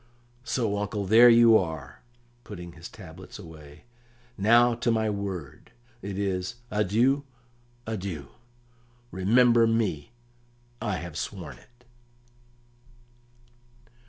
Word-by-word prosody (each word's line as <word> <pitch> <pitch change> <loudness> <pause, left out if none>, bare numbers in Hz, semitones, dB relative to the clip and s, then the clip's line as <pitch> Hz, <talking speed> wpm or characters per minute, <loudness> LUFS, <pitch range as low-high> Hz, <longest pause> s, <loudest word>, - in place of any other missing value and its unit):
So, 110 -6 -1
uncle, 105 0 -3
there 115 +5 +7
you 115 -1 +7
are," 80 -7 -2 0.4
putting 90 -4 -9
his 85 0 -11
tablets 90 -2 -12
away. 80 -6 -13 0.5
"Now 120 +4 +4
to 120 +1 -2
my 110 -2 +1
word. 95 -4 -6 0.3
It 100 -1 -6
is 95 +1 -2 0.2
'Adieu, 115 +7 +2 0.6
adieu! 95 -9 -5 0.8
Remember 115 +5 +4
me!' 115 -7 -1 0.7
I 105 -3 -1
have 85 -3 -7
sworn 90 -7 -7
it!" 125 0 -25
105 Hz, 100 wpm, -26 LUFS, 90-115 Hz, 0.8 s, there